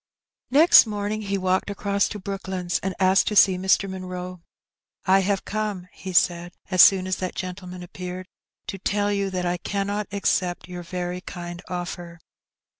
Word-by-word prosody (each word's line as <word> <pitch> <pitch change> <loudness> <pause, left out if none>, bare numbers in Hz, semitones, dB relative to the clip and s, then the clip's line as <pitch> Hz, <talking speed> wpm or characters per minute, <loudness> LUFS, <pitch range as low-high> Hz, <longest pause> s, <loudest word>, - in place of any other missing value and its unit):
Next 295 -2 +7
morning 210 0 -3
he 200 -1 -2
walked 185 +1 0
across 200 0 0
to 210 - -6
Brooklands, 190 -2 -3
and 190 -1 -3
asked 190 +1 +4
to 210 - -1
see 195 -2 +6
Mr. 190 +1 +2
Munroe. 185 -1 -6 0.3
" - - -70 0.3
I 190 +1 +5
have 195 0 -1
come," 205 -4 -3
he 190 - -8
said, 175 0 +2 0.2
as 185 -1 +6
soon 190 -2 +7
as 185 0 -1
that 185 -1 -4
gentleman 180 -1 -6
appeared, 180 +1 -7 0.4
"to 195 - -6
tell 205 +2 0
you 200 -1 -1
that 185 -1 -3
I 175 0 0
cannot 200 +2 -3
accept 185 -3 -1
your 180 -1 -7
very 180 +1 -4
kind 175 -2 -7
oflfer.'' 175 -1 -5
185 Hz, 170 wpm, -24 LUFS, 180-200 Hz, 0.4 s, Next